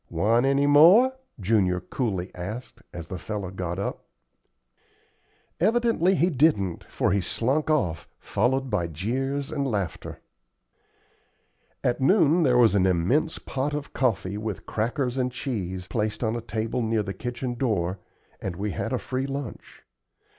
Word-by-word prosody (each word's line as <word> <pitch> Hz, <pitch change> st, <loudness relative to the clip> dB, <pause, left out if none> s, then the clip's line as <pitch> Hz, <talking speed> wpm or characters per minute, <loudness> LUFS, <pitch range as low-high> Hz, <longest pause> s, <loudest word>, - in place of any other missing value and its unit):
"Want 115 Hz, +9 st, +2 dB
any 140 Hz, +1 st, +3 dB
more?" 175 Hz, -, +7 dB, 0.3 s
Junior 95 Hz, -3 st, +2 dB
coolly 95 Hz, -5 st, -3 dB
asked, 105 Hz, +8 st, -7 dB
as 85 Hz, -1 st, -7 dB
the 90 Hz, -, -6 dB
fellow 100 Hz, -1 st, -4 dB
got 90 Hz, -2 st, -4 dB
up. 100 Hz, -, -4 dB, 1.5 s
Evidently 215 Hz, -2 st, +3 dB
he 180 Hz, +1 st, +2 dB
didn't, 125 Hz, -, +2 dB
for -, -, 0 dB
he 100 Hz, +1 st, +2 dB
slunk 135 Hz, -, 0 dB
off, 90 Hz, -, 0 dB
followed 130 Hz, +5 st, 0 dB
by 90 Hz, -5 st, 0 dB
jeers 135 Hz, -, -2 dB
and 140 Hz, -3 st, -1 dB
laughter. 100 Hz, -7 st, -3 dB, 1.6 s
At 125 Hz, +1 st, 0 dB
noon 170 Hz, +1 st, +4 dB
there 130 Hz, -6 st, +4 dB
was 120 Hz, -4 st, +5 dB
an 95 Hz, -2 st, +3 dB
immense 95 Hz, -, +1 dB
pot 140 Hz, +2 st, -3 dB
of 150 Hz, -1 st, -6 dB
coffee 105 Hz, -6 st, 0 dB
with 110 Hz, -2 st, -5 dB
crackers 125 Hz, +3 st, -1 dB
and 125 Hz, -1 st, 0 dB
cheese, 95 Hz, -9 st, -4 dB
placed 105 Hz, +4 st, -2 dB
on 110 Hz, 0 st, 0 dB
a 120 Hz, -, -3 dB
table 110 Hz, +2 st, -2 dB
near 110 Hz, -1 st, 0 dB
the 95 Hz, -1 st, -4 dB
kitchen 120 Hz, +4 st, -4 dB
door, 100 Hz, -7 st, -1 dB, 0.4 s
and 95 Hz, -, -4 dB
we 100 Hz, +3 st, -3 dB
had -, -, -3 dB
a -, -, +2 dB
free 130 Hz, +1 st, -3 dB
lunch. 140 Hz, -3 st, -7 dB
115 Hz, 145 wpm, -26 LUFS, 95-140 Hz, 1.6 s, more